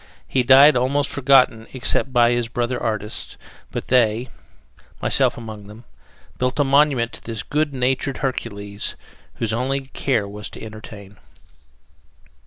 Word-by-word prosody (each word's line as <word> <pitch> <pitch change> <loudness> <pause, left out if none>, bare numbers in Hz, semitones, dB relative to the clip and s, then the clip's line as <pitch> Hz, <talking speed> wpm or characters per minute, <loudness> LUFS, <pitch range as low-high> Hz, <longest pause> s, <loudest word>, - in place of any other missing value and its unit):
He 130 - +1
died 135 +4 +7
almost 130 +3 0
forgotten 130 -5 +3
except 130 +1 0
by 120 -1 +4
his 120 -1 0
brother 120 +1 -2
artists, 110 -1 -4 0.3
but - - -6
they 120 -1 +2 0.7
(myself - - +3
among 110 -3 -9
them) 105 +3 -13 0.6
built 125 +3 -1
a - - +5
monument 140 -4 +2
to - - -11
this 115 -4 -5
good 150 0 -1
natured 130 +1 -1
Hercules, 100 -6 -4 0.4
whose 110 -2 -2
only 130 +4 -1
care 130 -5 -2
was 105 +1 -7
to - - -11
entertain. 105 -2 -11
120 Hz, 135 wpm, -21 LUFS, 110-135 Hz, 0.7 s, died